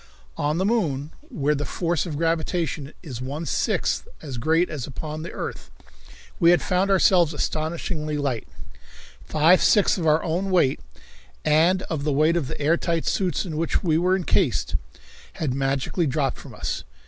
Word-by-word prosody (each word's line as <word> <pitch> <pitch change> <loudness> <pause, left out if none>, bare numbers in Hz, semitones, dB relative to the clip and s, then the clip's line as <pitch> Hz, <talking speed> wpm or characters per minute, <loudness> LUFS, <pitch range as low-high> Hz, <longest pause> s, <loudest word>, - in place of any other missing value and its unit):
On 150 +2 0
the 190 - +1
moon, 160 - 0 0.2
where 145 0 0
the 145 0 -2
force 170 +2 -1
of 150 -4 -4
gravitation 165 -2 -1
is 130 -7 -7
one 145 +6 -4
sixth 65 - 0
as 135 -6 -6
great 160 +7 +2
as 145 -5 -5
upon 155 +3 -6
the 170 - -6
earth, - - -6 0.7
we 170 - +6
had 175 - +6
found 185 +1 +1
ourselves 180 -4 +4
astonishingly 155 0 -2
light. 135 -5 -2 0.8
Five 160 +4 +4
sixths 205 -2 +4
of 165 - -1
our 155 +1 +3
own 175 +4 -1
weight, 175 -8 +3 0.7
and 165 +5 +3
of 155 -4 -4
the 150 - 0
weight 155 +4 +3
of 165 -6 0
the - - -6
air 155 +3 +3
tight 165 -2 -1
suits 185 0 0
in 160 -4 -5
which 165 +5 0
we 160 -3 +2
were 180 +2 +3
incased, 180 - +1 0.6
had 150 -6 -2
magically 135 +5 0
dropped 135 -1 -1
from - - -11
us. - - -3
160 Hz, 170 wpm, -24 LUFS, 145-175 Hz, 0.8 s, we